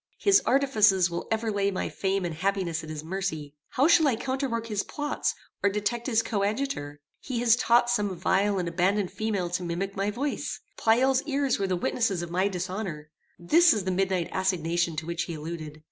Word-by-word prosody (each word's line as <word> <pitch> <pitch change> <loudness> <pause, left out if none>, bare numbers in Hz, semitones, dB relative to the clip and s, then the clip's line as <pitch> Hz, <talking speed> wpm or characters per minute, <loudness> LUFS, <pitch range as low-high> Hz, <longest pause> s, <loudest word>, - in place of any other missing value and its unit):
His 400 0 +4
artifices 215 -9 +4
will 170 - -4
ever 220 0 0
lay 200 -1 +1
my 190 - -2
fame 195 -1 -1
and 170 - -3
happiness 180 -2 -1
at 155 - -9
his 155 -1 -6
mercy. 160 -5 -4 0.2
How 275 +4 +3
shall 325 -2 +5
I 260 - +2
counterwork 260 -1 -2
his 210 -3 -1
plots, 295 +5 -2 0.3
or 200 - +3
detect 210 +4 -2
his 230 -3 +2
coadjutor? 205 - -2 0.2
He 255 -3 -5
has 230 -2 +5
taught 240 0 +3
some 210 -5 0
vile 195 +3 +1
and 180 -2 -1
abandoned 185 +3 +1
female 200 -5 -2
to 180 - -1
mimic 180 +3 -3
my 200 +1 0
voice. 270 +7 -3 0.2
Pleyel's 255 +4 +3
ears 280 -4 0
were 195 - 0
the 185 - 0
witnesses 190 0 0
of 170 - -7
my 185 +3 +2
dishonor. 180 -4 -5 0.3
This 325 - +5
is 210 - -2
the 185 - -1
midnight 185 -2 0
assignation 170 -3 0
to 155 +1 -4
which 170 +1 -2
he 170 - -5
alluded. 155 -1 -7
195 Hz, 190 wpm, -27 LUFS, 175-230 Hz, 0.3 s, shall